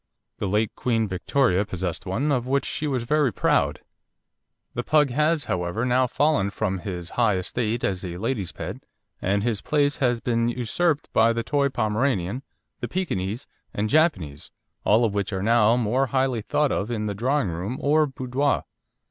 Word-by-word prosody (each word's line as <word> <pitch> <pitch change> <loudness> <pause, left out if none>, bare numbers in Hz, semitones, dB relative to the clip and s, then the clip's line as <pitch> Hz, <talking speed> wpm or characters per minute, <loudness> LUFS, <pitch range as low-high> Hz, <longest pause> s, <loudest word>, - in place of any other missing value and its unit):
The 100 - -1
late 105 +2 +1
Queen 115 -3 0
Victoria 95 +2 +1
possessed 95 -2 -4
one, 130 +11 0
of 125 -3 0
which 140 +1 +1
she 150 - -3
was 130 -4 -1
very 145 +1 +2
proud. 75 -6 +1 0.9
The - - -2
Pug 150 -3 +3
has, 150 +3 +2
however, 90 +6 -2
now 125 +1 +3
fallen 145 -6 +2
from 100 -2 -2
his 90 -2 -6
high 105 -4 +4
estate 110 +5 -2
as 95 -1 -1
a 90 -2 -5
ladies' 105 -2 -2
pet, - - -6 0.4
and 100 +2 +1
his 115 -4 0
place 145 -1 +1
has 125 -3 +1
been 115 0 0
usurped 140 +7 -1
by 115 +1 +4
the 115 0 -2
Toy 140 +2 +1
Pomeranian, 110 -2 0 0.4
the - - -3
Pekinese, 120 - -2 0.3
and 105 +1 -1
Japanese, 135 - +1 0.3
all 110 +3 +4
of 105 - -1
which 100 -1 -1
are 95 -1 -2
now 115 0 +4
more 125 +4 +1
highly 130 -3 0
thought 150 +6 +1
of 105 - -1
in 110 -3 -2
the 105 - -2
drawing 125 +1 0
room 90 +9 -4
or 150 +1 +3
boudoir. 130 +1 -1
115 Hz, 175 wpm, -24 LUFS, 100-135 Hz, 0.9 s, high